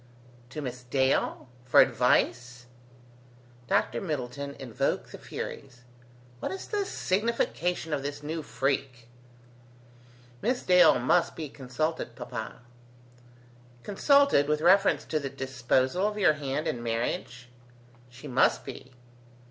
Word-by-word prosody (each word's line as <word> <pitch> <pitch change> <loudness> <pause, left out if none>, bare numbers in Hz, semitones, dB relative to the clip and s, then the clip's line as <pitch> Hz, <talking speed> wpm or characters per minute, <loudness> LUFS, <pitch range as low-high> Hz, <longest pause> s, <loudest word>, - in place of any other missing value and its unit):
"To 150 +4 -6
Miss 125 -1 -5
Dale? 130 +1 0 0.2
for 125 - +4
advice?" 125 -1 +2 1.0
Dr - - +1
Middleton 140 -4 -4
invoked 120 -4 -2
the - - -9
Furies. 125 0 -7 0.6
"What - - -3
is 380 - -7
the 410 -2 -1
signification 185 - -1
of 145 - -1
this 145 +1 -5
new 160 +2 -3
freak?" 130 -4 -2 1.3
"Miss 250 +2 0
Dale 180 -1 +6
must 175 - +2
be 155 -3 -5
consulted, 135 0 -3
papa." 120 -2 -7 1.2
"Consulted 280 - +4
with 150 0 0
reference 180 -3 +4
to 155 - -1
the 140 -2 -4
disposal 130 +7 0
of 210 0 -4
your 190 -7 +4
hand 145 +1 -3
in 120 - -2
marriage?" 120 +1 -3 0.6
"She 125 +4 -11
must 130 -1 +2
be." 130 - -9
140 Hz, 115 wpm, -28 LUFS, 125-165 Hz, 1.3 s, Dale